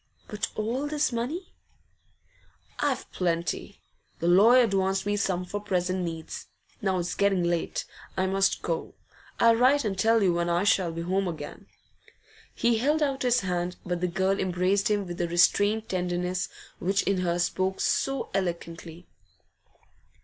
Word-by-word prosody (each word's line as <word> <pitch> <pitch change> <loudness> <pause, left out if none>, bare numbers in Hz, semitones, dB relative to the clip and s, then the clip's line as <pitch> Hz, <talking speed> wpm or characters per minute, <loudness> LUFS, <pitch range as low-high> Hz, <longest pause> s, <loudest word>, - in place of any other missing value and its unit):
'But 210 -1 -2
all 240 +7 -2
this 300 -1 0
money?' 270 +11 -4 1.3
'I've - - -1
plenty. 170 -2 -2 0.4
The 170 - -2
lawyer 225 +8 +7
advanced 195 -2 0
me 205 0 +1
some 185 -3 -1
for 205 +3 -4
present 185 -2 -1
needs. 165 -2 -6 0.3
Now 190 -3 +1
it's 175 0 -2
getting 195 -3 +2
late, 170 -1 -1 0.3
I 185 - +2
must 195 +1 +1
go. 165 -2 -3 0.4
I'll 230 0 +6
write 260 +3 +4
and 200 -2 -1
tell 225 +3 +3
you 180 -3 +3
when 170 0 0
I 170 +2 +2
shall 190 -4 +2
be 165 +1 -5
home 190 +2 0
again.' 165 -3 -7 0.9
He 235 -1 +2
held 300 +5 +2
out 275 -2 -1
his 250 -1 +3
hand, 180 -1 -2
but 175 -1 -2
the 180 - +1
girl 190 +2 0
embraced 185 +2 +1
him 205 -2 +1
with 175 -1 -7
the 175 - 0
restrained 205 +5 +3
tenderness 180 0 -2 0.3
which 195 +2 +1
in 195 -2 +1
her 175 -1 0
spoke 185 +2 0
so 270 0 0
eloquently. 170 -2 -4
190 Hz, 155 wpm, -27 LUFS, 175-215 Hz, 1.3 s, lawyer